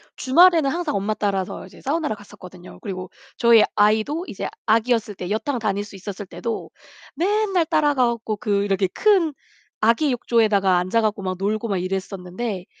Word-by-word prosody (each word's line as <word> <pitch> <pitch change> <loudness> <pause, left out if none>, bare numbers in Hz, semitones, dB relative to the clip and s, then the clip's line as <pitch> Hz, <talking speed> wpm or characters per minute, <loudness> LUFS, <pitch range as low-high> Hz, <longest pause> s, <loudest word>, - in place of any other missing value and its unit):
주말에는 330 +2 +5
항상 335 -2 -2
엄마 200 +2 0
따라서 195 -3 -2
이제 - - -15
사우나를 300 -3 -1
갔었거든요. 185 -3 -13
그리고 185 -3 -6 0.3
저희 235 -2 +6
아이도 220 - +2
이제 - - -5 0.2
아기였을 225 -2 +2
때 180 -1 -6
여탕 250 +5 -1
다닐 205 -3 -1
수 205 - -12
있었을 200 +1 -7
때도 230 +4 -5 0.5
맨날 390 +1 +1
따라가 290 -5 +2
갖고 225 -2 -3
그 200 -1 0
이렇게 195 -1 +1
큰 375 -8 +3 0.5
아기 230 +7 +3
욕조에다가 215 -6 +2
앉아 185 +6 +1
갖고 210 -2 -1
막 185 -1 -3
놀고 215 +3 -1
막 200 -3 -1
이랬었는데 185 +2 -4
215 Hz, 370 characters per minute, -22 LUFS, 195-270 Hz, 0.5 s, 저희